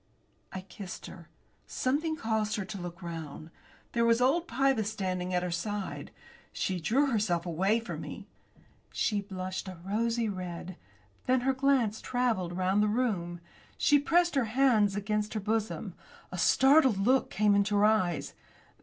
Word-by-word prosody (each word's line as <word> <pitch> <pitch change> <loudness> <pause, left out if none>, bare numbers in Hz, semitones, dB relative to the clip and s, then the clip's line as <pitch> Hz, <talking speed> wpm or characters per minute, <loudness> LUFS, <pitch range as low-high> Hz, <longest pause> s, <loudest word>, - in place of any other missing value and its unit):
I 190 - -5
kissed 185 0 -9
her. 170 -3 -11 0.4
Something 305 +5 -1
caused 220 -5 -1
her 205 -4 -3
to 195 -1 -7
look 175 +1 -8
round. 160 -2 -7 0.4
There 235 - +1
was 230 0 +4
old 300 +8 +2
Pybus 260 -5 +1
standing 185 -4 -3
at 180 -1 0
her 180 - -2
side. 200 +3 -4 0.4
She 185 -2 -2
drew 265 - +2
herself 190 -7 0
away 190 +6 +1
from 230 - -6
me. - - -8 0.7
She 205 -2 0
blushed 185 -1 -5
a 185 -2 -7
rosy 230 +3 0
red; 180 -2 -5 0.5
then 255 0 +3
her 265 +2 +1
glance 260 -5 +1
travelled 225 -9 -1
round 190 +2 +2
the 210 - +3
room. 200 -7 -1 0.4
She 290 - +4
pressed 345 +4 +2
her 270 -4 +2
hands 220 -4 +3
against 210 +1 -2
her - - 0
bosom. 220 +1 -2 0.4
A - - -5
startled 265 -5 +5
look 250 +7 +2
came 210 +1 +2
into 200 +1 +2
her 205 +1 +4
eyes. 200 -6 +1
210 Hz, 155 wpm, -30 LUFS, 185-245 Hz, 0.7 s, startled